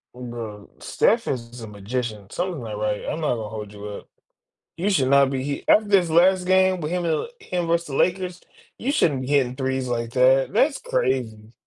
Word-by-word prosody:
Bruh, 115 -4 -8
Steph - - +1
is 120 -1 -4
a 110 - -7
magician. 105 0 -5
Something's 175 -8 -3
not 105 -2 -5
right 105 0 -1
I'm - - -3
not 150 -6 0
gonna 110 -2 -5
hold 105 -1 -7
you 105 0 -9
up. 105 -1 -8 0.7
You 190 +4 0
should 140 -10 +2
not 140 -1 +5
be 135 -1 -2
he 140 +1 -5
after 215 - +5
this 190 -4 +4
last 180 +3 +4
game 185 0 +3
with 150 -1 -3
him 180 0 -1
and 165 - +1
the - - +2
l - - -5
him 180 -1 -3
versus 170 -1 0
the 135 - -5
Lakers, 180 +1 0 0.4
you 260 - -1
shouldn't 150 - +2
be 130 - -5
hitting 135 -4 +2
threes 130 -1 -2
like 115 -1 -3
that. 130 +3 +4
That's 275 +6 +3
crazy. 125 - -2
135 Hz, 210 wpm, -23 LUFS, 115-180 Hz, 0.7 s, not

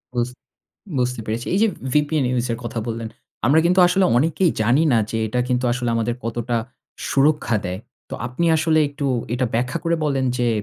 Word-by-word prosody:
বুঝত 120 +1 -1 0.7
বুঝতে 125 -1 -1
পেরেছি। 115 +2 -3
এই - - +2
যে 225 - +5 0.2
VPN 150 -1 +2
ইউজ 125 -1 0
এর 115 - -3
কথা 120 0 -4
বললেন, 115 -1 -4 0.4
আমরা 150 +5 +5
কিন্তু 180 +2 +4
আসলে 185 +2 +2
অনেকেই 165 +6 +2
জানি 125 +8 +3
না, 115 - +4
যে 115 - -1
এটা 125 +3 -1
কিন্তু 125 0 0
আসলে 120 0 -2
আমাদের 115 +1 0
কতটা 120 +1 -2 0.5
সুরক্ষা 140 -5 +2
দেয়। 90 +2 -4 0.3
তো - - -4
আপনি 125 +8 -2
আসলে 160 0 +2
একটু 145 0 -4 0.3
এটা 125 0 0
ব্যাখ্যা 125 +2 0
করে 170 0 +1
বলেন 135 -3 0
যে 120 -1 +2
125 Hz, 185 wpm, -21 LUFS, 120-150 Hz, 0.7 s, যে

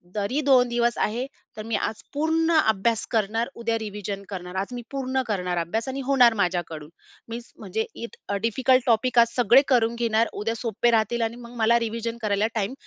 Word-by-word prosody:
जरी 210 +7 -1
2 265 -3 +4
दिवस 240 0 0
आहे, 235 +4 -1 0.3
तर 215 - -5
मी 225 0 -2
आज 210 +1 -2
पूर्ण 320 +3 +1 0.2
अभ्यास 220 +2 +1
करणार, 225 +1 0
उद्या 230 -1 -1
रिव्हिजन 205 -2 -5
करणार. 180 -2 -7
आज 190 +1 -1
मी 245 - -5
पूर्ण 265 -1 -1
करणार 180 -4 -2
अभ्यास 215 +9 -2
आणि 270 +1 -3
होणार 250 -4 +5
माझ्याकडून. 175 -6 -2 0.4
मी 230 +1 -4
स 235 - -21
म्हणजे, 445 0 -3
इत 235 - -8
अ, 200 - 0
डिफिकल्ट 255 +2 +2
टॉपिक 240 +1 +3
आज 235 0 +4
सगळे 245 +2 +6
करून 235 -3 +2
घेणार, 230 -1 +1
उद्या 225 +2 -2
सोपे 230 +1 0
राहतील. 230 +1 +1
आणि 225 +1 -1
मग 240 0 -11
मला 235 +1 +4
रिव्हिजन 230 0 -3
करायला 210 0 +1
टाईम 220 +3 -1
230 Hz, 190 wpm, -25 LUFS, 210-245 Hz, 0.4 s, सगळे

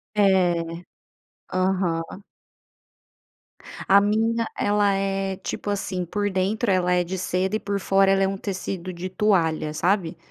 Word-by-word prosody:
É, 190 -4 +4 1.0
aham. 185 -1 -1 1.6
A 200 +1 +6
minha 225 +2 +1
ela 205 -1 +2
é 195 -1 -1
tipo, 205 +1 -5
assim, 190 -3 -2
por 205 +4 -1
dentro 200 +4 0
ela 180 -1 +2
é 180 0 +2
de 185 +2 -5
seda 185 +3 -1
e - - 0
por 200 0 -2
fora 195 0 +3
ela 195 0 +3
é - - +3
um 195 0 -3
tecido 190 -2 -5
de 180 +2 -5
toalha, 165 -7 +1
sabe? 180 -2 0
195 Hz, 140 wpm, -24 LUFS, 185-200 Hz, 1.6 s, A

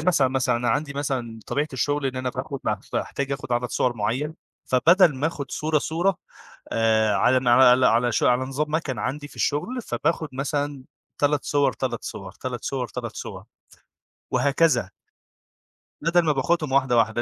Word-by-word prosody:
مثلًا، 155 -6 +3
مثلًا 130 -2 +1
أنا 120 0 -1
عندي 140 +4 -1
مثلًا 125 -5 -3
طبيعة 150 +2 -1
الشغل 145 +2 0
إن 130 -1 -3
أنا 130 0 -2
باخد 135 +2 -5
م - - +1 0.2
باحتاج 140 0 -2
آخد 135 -2 -4
عدد 120 +1 0
صور 120 -2 0
معيّن، 130 +9 -2 0.3
فبدل 165 +5 +5
ما 145 +4 0
آخد 145 -4 -5
صورة، 155 0 0
صورة 175 +6 0 0.6
آآ، 110 -2 +2
على 130 +6 +3
م 125 - -1
على 125 +1 +6
على 120 +1 +3
ش - - 0
على 125 +1 +3
نظام 135 +3 -2
مَكَن 135 -8 -1
عندي 145 +6 -3
في - - -17
الشغل، 235 - -1
فباخد 160 -3 -1
مثلًا 140 0 -3 0.3
3 145 -1 +1
صُوَر، 145 -1 +2
3 125 -4 -4
صُوَر، - - -7
3 - - -6
صُوَر، - - -2
3 - - -6
صُوَر، - - -7 0.9
وَهكذا. 135 +1 +2 1.1
بَدَل 170 +1 +3
ما 155 - +3
باخدهم 150 +1 0
واحدة، 135 -3 +3
واحدة، 115 +1 +2
135 Hz, 170 wpm, -24 LUFS, 125-150 Hz, 1.1 s, على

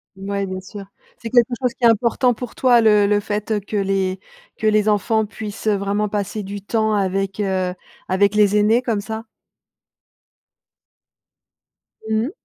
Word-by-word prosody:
Mouais, 195 0 -3
bien 185 0 -5
sûr. 200 +1 -10 0.4
C'est 230 - -5
quelque 240 0 +3
chose 250 -2 0
qui 245 - -15
est - - +8
important 235 +3 +2
pour 245 +1 -8
toi, 245 -2 +4
le 210 -2 +5
le 205 0 +2
fait 210 0 -2
que 215 - -5
les 195 -1 0 0.4
que 220 - -4
les 215 0 +3
enfants 215 +1 +1
puissent 215 0 -7
vraiment 205 0 0
passer 205 +1 -3
du 200 +1 -6
temps 220 +1 0
avec, 195 0 -1
heu, 185 -2 -1 0.3
avec 200 +2 +2
les 210 -1 +3
aînés 215 +4 +3
comme 230 -5 -1
ça? 220 +2 -6 2.8
Mmh 220 0 +1
mh. 280 - -5
210 Hz, 160 wpm, -20 LUFS, 200-220 Hz, 2.8 s, est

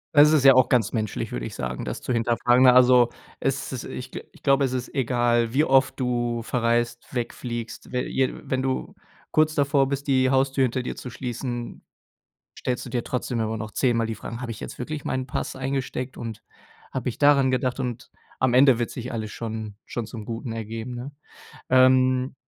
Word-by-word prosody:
Es 150 +1 +8
ist 145 -3 +4
ja 135 -1 +8
auch 130 - +5
ganz 115 -4 +2
menschlich, 110 -3 -3
würde - - -4
ich - - -7
sagen, 65 -1 -4
das - - -5
zu - - -4
hinterfragen. 120 +2 +3
Ne, 125 -1 +8
also, 125 -1 +6 0.3
es 135 +1 -1
ist 130 - -5
ich 130 +1 -7
gl - - -7
ich - - -20
glaube, 140 0 +4
ist 125 -1 -3
egal, 120 -3 +1
wie 150 +3 +4
oft 135 -1 +3
du 120 -2 -1
verreist, 120 0 -1
wegfliegst. 120 -1 -5
Wenn 125 0 -1
ir 130 -1 -2
wenn 130 0 0
du 130 0 -2 0.4
kurz 155 0 +3
davor 140 -1 +3
bist, 140 +1 -3
die 130 -1 +3
Haustür 135 0 +2
hinter 125 0 0
dir - - -5
zu 125 - -7
schließen, 120 0 -5 0.8
stellst 125 0 -2
du - - -8
dir 120 -1 -2
trotzdem 125 -1 -2
immer 110 0 -1
noch 110 0 -6
10 125 -3 +1
Mal 115 0 +1
die 110 - -3
Fragen: 115 +3 -7
„Habe 120 -2 -4
ich 110 - -8
jetzt - - -8
wirklich 150 +3 -5
meinen 130 0 -2
Pass - - -3
eingesteckt, 130 -1 -3
und 115 -3 -7 0.5
habe 130 -1 -3
ich 120 - -3
daran 140 -2 +5
gedacht?“ 130 +1 0
Und 125 -2 -4 0.3
am 130 -1 +2
Ende 130 -2 +6
wird 120 - -1
sich 125 -1 -6
alles 110 -2 -4
schon 110 -2 -5
schon 120 -2 -4
zum 110 -1 -8
Guten 115 +1 -5
ergeben, 115 +2 -5
ne? 125 +4 -6 0.6
Ähm, 130 0 +4
125 Hz, 200 wpm, -25 LUFS, 115-130 Hz, 0.8 s, Es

